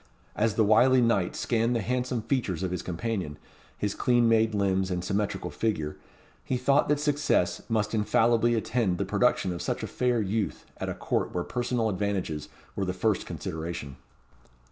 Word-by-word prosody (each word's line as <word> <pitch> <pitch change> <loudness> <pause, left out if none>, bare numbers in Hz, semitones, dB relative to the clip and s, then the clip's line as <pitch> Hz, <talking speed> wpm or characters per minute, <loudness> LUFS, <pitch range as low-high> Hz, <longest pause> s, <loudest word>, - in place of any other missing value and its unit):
As 110 -1 +1
the 110 - +4
wily 125 +5 +5
knight 115 -7 +2
scanned 115 0 +1
the 115 - +1
handsome 125 +1 -1
features 110 - -1
of 95 - -1
his 90 - -2
companion, 90 -4 -3 0.4
his 105 -1 -1
clean 120 -1 +3
made 110 -1 +3
limbs, 95 -2 +1
and 90 -1 -2
symmetrical 100 +2 -2
figure, 80 -10 -2 0.5
he 130 - -1
thought 140 +4 +2
that 150 -1 +3
success 145 -11 +1
must 110 -1 0
infallibly 115 +2 +3
attend 110 -4 0
the 100 - -1
production 100 -2 +1
of 85 - -5
such - - -2
a - - -2
fair 125 -2 0
youth 105 0 -2
at - - -4
a - - -3
Court - - -2
where 90 - 0
personal 120 0 -1
advantages 95 -7 -2 0.3
were 100 - -1
the 90 - -2
first 105 +2 0
consideration. 80 -4 -5
110 Hz, 170 wpm, -28 LUFS, 95-120 Hz, 0.5 s, wily